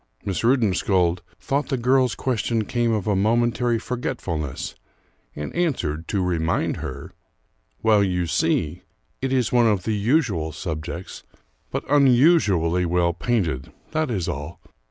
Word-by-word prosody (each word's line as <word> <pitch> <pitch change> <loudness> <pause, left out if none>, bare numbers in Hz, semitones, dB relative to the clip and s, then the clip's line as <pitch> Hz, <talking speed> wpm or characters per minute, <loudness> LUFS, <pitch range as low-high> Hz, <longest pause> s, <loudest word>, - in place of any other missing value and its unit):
Miss 95 -3 -2
Rudensköld 95 -7 +2 0.2
thought 140 +10 -1
the 135 - 0
girl's 125 0 +2
question 115 -3 -1
came 120 0 0
of 105 -4 -1
a 105 -2 +1
momentary 120 +3 +2
forgetfulness, 105 - -4 0.6
and 75 - -5
answered, 90 - -1
to 100 -3 0
remind 85 -2 0
her: - - -7 0.7
"Well, 105 -2 +5
you 90 -2 0
see, 80 +1 0 0.4
it 135 0 -1
is 130 -3 +1
one 120 -2 +4
of 100 -5 +1
the 110 - -1
usual 105 - +1
subjects, 85 +2 -6 0.5
but - - -4
unusually 125 - +4
well 85 0 +1
painted, 85 - -1 0.2
that 155 -2 0
is 95 -8 -2
all. 75 +4 -5
105 Hz, 135 wpm, -23 LUFS, 85-125 Hz, 0.7 s, Well